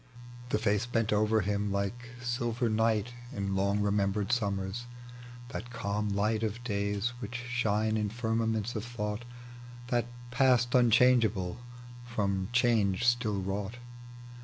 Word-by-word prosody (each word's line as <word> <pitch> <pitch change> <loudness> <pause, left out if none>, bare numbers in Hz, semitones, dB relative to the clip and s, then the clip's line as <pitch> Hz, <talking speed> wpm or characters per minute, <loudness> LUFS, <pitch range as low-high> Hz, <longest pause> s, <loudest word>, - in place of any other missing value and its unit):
The - - +2
face 105 +1 +1
bent 115 -3 +1
over 110 0 +3
bim 100 +1 -1
like 100 +5 -2
silver 120 -1 0
night 110 +1 +1 0.2
In 100 -6 -2
long 100 +1 +1
remembered 100 0 +1
snmmera; 100 -1 -1 0.6
that 125 -1 -6
calm 105 -3 -2
light 105 +2 +1
Of 115 +2 -2
days 100 0 -1
which 120 -1 -6
shine 110 -3 +1
in 105 -1 0
firmaments 110 0 -1
of 110 - -2
thought, 110 -1 -4 0.6
That 120 -2 +1 0.2
past 125 -1 +3
unchangeable, 115 -6 +4 0.5
from 100 -5 -1
change 115 -5 +2
still 115 -4 +2
wrought. 100 +4 -3
110 Hz, 125 wpm, -30 LUFS, 100-120 Hz, 0.6 s, unchangeable